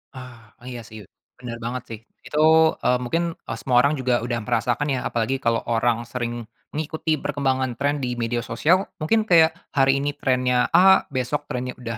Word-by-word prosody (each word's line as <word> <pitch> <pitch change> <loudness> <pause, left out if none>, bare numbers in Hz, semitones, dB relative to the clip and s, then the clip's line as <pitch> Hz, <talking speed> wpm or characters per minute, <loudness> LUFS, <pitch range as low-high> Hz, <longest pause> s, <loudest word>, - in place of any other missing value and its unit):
Ah, 120 -4 -12
iya 120 -2 -6
sih 110 -1 -11 0.3
bener 120 -2 -7
banget 120 +1 -4
sih 115 -2 -7 0.3
itu, 150 - -3 0.4
eee, 125 - +3
mungkin, 165 +8 -1 0.2
eee, 115 - -4
semua 125 -2 +1
orang 140 +2 +3
juga 125 -2 +1
udah 120 -1 -2
merasakan 110 +7 -1
ya, 130 -2 0
apalagi 120 +3 -1
kalau 115 -2 0
orang 120 0 +1
sering 120 -1 -4 0.3
mengikuti 160 +1 -2
perkembangan 135 -4 -2
trend 145 +1 0
di 125 -1 -2
media 120 +1 -1
sosial 155 +12 +1
mungkin 215 +8 +2
kayak 165 -5 +5 0.2
hari 135 0 +2
ini 145 +1 -1
trendnya 125 -2 +1
A 190 +2 +6
besok 140 +2 -3
trendnya 125 0 -4
udah 115 -2 -5
125 Hz, 175 wpm, -23 LUFS, 120-145 Hz, 0.4 s, A